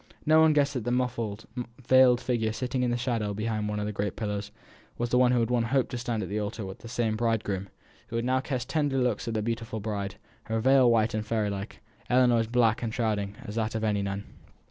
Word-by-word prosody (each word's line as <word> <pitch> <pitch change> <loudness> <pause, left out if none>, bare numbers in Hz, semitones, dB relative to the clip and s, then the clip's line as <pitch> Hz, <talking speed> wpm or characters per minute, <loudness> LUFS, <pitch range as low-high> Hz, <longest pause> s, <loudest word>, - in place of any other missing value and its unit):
No 155 +1 +6
one 160 -1 +6
guessed 145 -1 +2
that 125 -5 -3
the 120 - -2
muffled, 120 -4 -1 0.3
veiled 130 -1 +5
figure, 115 -4 0
sitting 125 +2 -2
in 125 - +1
the 120 - 0
shadow 115 -4 -1
behind 110 0 -2
one 105 0 -2
of 105 - -2
the 105 - -2
great 100 -1 -2
pillars, 105 -2 -3 0.5
was 120 0 -1
that - - +3
of - - +5
one 125 -1 +5
who 125 - +3
had 115 +1 0
once 120 -2 +2
hoped 135 +1 +1
to 125 - -3
stand 115 -3 -2
at 95 - -6
the 105 +2 -1
altar 105 0 -4
with 95 0 -8
the - - -10
same 115 -2 0
bridegroom, 110 -4 -1 0.4
who 115 - -2
now 130 +2 +1
cast 130 -1 -3
tender 145 -4 0
looks 125 -4 0
at 115 - -2
the 110 - 0
beautiful 115 0 -3
bride; 100 -2 -3 0.3
her 115 0 -1
veil 130 +1 +5
white 115 -1 +3
and 110 0 -2
fairy 110 -2 0
like, 100 +1 -6 0.3
Ellinor's 120 -3 +4
black 115 -1 +2
and 115 -2 -2
shrouding 105 -4 -1
as 105 - -7
that 110 0 -1
of 110 - -2
any 105 -2 +1
nun. 100 0 -3
115 Hz, 240 wpm, -28 LUFS, 105-125 Hz, 0.5 s, No